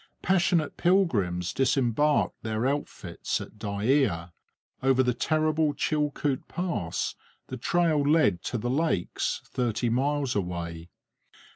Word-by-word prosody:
Passionate 175 -4 +2
pilgrims 105 - +1
disembarked 135 +2 +1
their 110 +1 -2
outfits 145 +2 -2
at 105 - -10
Dyea. 100 - 0 0.5
Over 130 0 +3
the 125 -1 +1
terrible 155 +2 +1
Chilcoot 150 -2 -1
Pass 170 - -2 0.4
the 130 - -5
trail 160 +4 +2
led 140 - +3
to 125 - -2
the 120 +2 -2
lakes, 140 - -1
thirty 120 -1 -1
miles 135 +1 0
away. 85 -3 -4
130 Hz, 110 wpm, -27 LUFS, 105-150 Hz, 0.5 s, Over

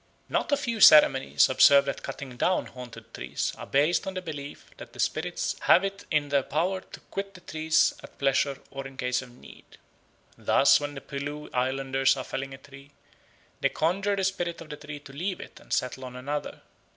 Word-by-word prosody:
Not - - -1
a 285 - +4
few 230 -4 -3
ceremonies 150 -5 +7
observed 140 +1 +6
at 140 - -3
cutting 130 -3 -7
down 180 +9 +1
haunted 125 -2 -11
trees - - -3
are - - -9
based 150 +8 +2
on 190 - -4
the 185 - -3
belief 145 -3 -8
that - - -11
the - - -14
spirits - - -1
have 180 - +5
it 195 0 -4
in 150 -3 +1
their 140 -1 +3
power 175 +8 -1
to - - -13
quit 195 0 -5
the 180 - -13
trees 155 -2 +2
at - - -14
pleasure 140 0 +1
or 135 0 -6
in 135 -1 -14
case 125 -1 0
of 130 - -11
need. 120 - -16 0.6
Thus 140 - +4
when 145 0 -5
the 135 - -7
Pelew 145 +2 -6
Islanders 135 +1 +1
are 130 - -3
felling 135 +1 -5
a - - -13
tree, 135 +1 -15 0.7
they - - +2
conjure 195 +5 0
the 195 - -2
spirit 175 -3 -2
of 165 - -11
the 150 - -6
tree 145 0 -8
to 140 -1 -13
leave 180 +6 -3
it - - -11
and - - -19
settle 130 +1 -1
on 125 0 -9
another. 145 +4 -5
145 Hz, 200 wpm, -27 LUFS, 135-175 Hz, 0.7 s, ceremonies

